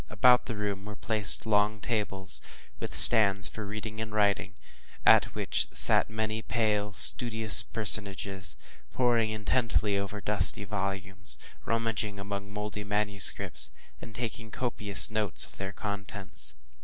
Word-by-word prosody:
About 125 +3 0
the 115 - -8
room 100 -1 -7
were 105 0 -12
placed 110 0 +6
long 105 0 -2
tables, 100 -4 -4 0.4
with - - -7
stands 100 -4 +8
for 110 -2 -11
reading 110 +1 -10
and 110 -1 -9
writing, 105 -2 -4 0.5
at - - +1
which - - -4
sat - - +3
many 110 0 -7
pale, 105 -3 -5
studious 110 0 +6
personages, 100 -3 0 0.3
poring 120 -3 -2
intently 110 -2 -4
over 100 +1 -9
dusty 100 -1 +1
volumes, 95 -1 -6 0.3
rummaging 115 -3 -5
among 100 0 -9
mouldy 105 0 -9
manuscripts, 105 -1 0 0.3
and 115 - -15
taking 115 -2 -8
copious 105 -5 +1
notes 110 -4 -1
of - - -18
their 95 0 -9
contents. 100 - -4
105 Hz, 130 wpm, -25 LUFS, 100-110 Hz, 0.5 s, stands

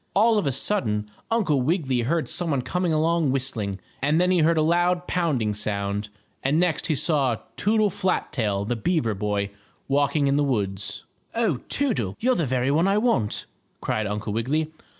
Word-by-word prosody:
All 220 +2 +5
of 165 - -1
a - - +2
sudden 120 - 0 0.2
Uncle 190 - +2
Wiggily 135 -4 +1
heard 155 +7 0
some 175 -2 -2
one 140 -4 0
coming 175 +7 -1
along 160 0 +2
whistling, 115 -8 -2 0.2
and 150 +4 +2
then 180 +1 +3
he 180 - +3
heard 165 +1 +3
a 155 - +3
loud 175 +2 +2
pounding 145 -14 0
sound, 105 0 -2 0.3
and 140 +4 +2
next 175 -2 +1
he 155 - +1
saw 135 -6 +1 0.2
Toodle 215 0 +2
Flat 185 0 -1
tail, 105 -7 0
the 120 - -1
beaver 125 -3 0
boy, 100 0 -2 0.4
walking 140 +1 +2
in 140 +1 +2
the 145 - +3
woods. 100 -7 -2 0.3
"Oh, 220 - +1
Toodle! 210 - 0
You're 255 +3 +3
the 170 - 0
very 130 +1 +1
one 165 +6 +3
I 200 +1 +3
want!" 210 - +1 0.3
cried 110 -1 -1
Uncle 105 +1 -3
Wiggily. 150 +8 -1
145 Hz, 180 wpm, -24 LUFS, 110-175 Hz, 0.4 s, All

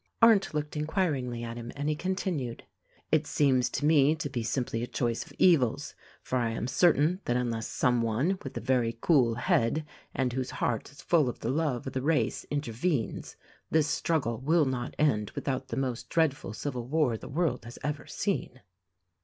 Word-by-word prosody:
Arndt 225 -4 +5
looked 150 0 -3
inquiringly 150 -7 -1
at 115 0 -5
him 120 0 -6
and 145 +1 -3
he 155 - +1
continued: 175 -8 -2 0.5
"It - - +3
seems 130 -4 +2
to 145 - -2
me 150 -1 +5
to 150 -3 -4
be 120 - -2
simply 115 0 -1
a 120 - -2
choice 120 -2 -1
of - - -16
evils; 150 -11 +3 0.3
for 130 - -1
I 115 -2 +1
am 115 0 -3
certain 160 +5 +3
that 120 - +1
unless 115 -2 -2
some 125 -1 +1
one 130 - 0
with 135 - -6
a - - -3
very 120 -3 +1
cool 125 -8 +3
head 125 +5 +1 0.3
and 130 -2 0
whose 130 0 -2
heart 115 -3 -1
is 140 - -14
full 155 -7 +3
of 120 - -7
the 115 - -1
love 145 -4 -1
of 135 - -5
the 130 - -1
race 135 -5 0
intervenes, 145 -1 -2 0.3
this 155 -2 +3
struggle 150 -6 0
will 155 +4 +3
not 125 -2 -3
end 110 -9 +2
without 130 -1 -2
the 115 - -4
most 130 -3 -2
dreadful 155 -10 +1
civil 125 -1 -4
war 145 -4 +2
the - - -8
world 150 -3 0
has 120 - -9
ever 150 0 -3
seen." 180 -10 -2
130 Hz, 185 wpm, -29 LUFS, 120-155 Hz, 0.5 s, Arndt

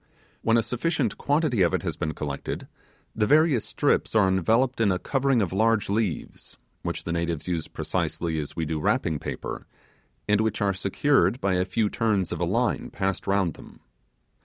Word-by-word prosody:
When 115 +1 +3
a 115 - +2
sufficient 130 -1 -1
quantity 145 -7 +1
of 85 -2 +3
it - - -2
has - - -2
been 75 -1 -3
collected, 70 -2 -5 0.5
the 105 -1 +1
various 150 -5 +4
strips - - 0
are 105 -3 +5
enveloped 115 +8 +2
in 105 -3 +4
a 90 - +1
covering 135 +2 +1
of 90 - -3
large 110 0 +2
leaves, 105 -6 -3 0.2
which - - -4
the 85 - -4
natives 85 -2 -2
use 85 -3 -2
precisely 80 -2 -2
as 75 - -6
we 80 - -1
do 80 0 -2
wrapping 75 0 0
paper, - - -6 0.6
and 105 0 +3
which 110 -1 0
are 100 -2 +1
secured 115 +4 +2
by 100 -7 +1
a 90 0 +1
few 105 +4 0
turns 105 -4 0
of - - -3
a - - +1
line - - 0
passed 95 0 -2
round 95 -4 +2
them. - - -14
100 Hz, 185 wpm, -26 LUFS, 85-115 Hz, 0.6 s, are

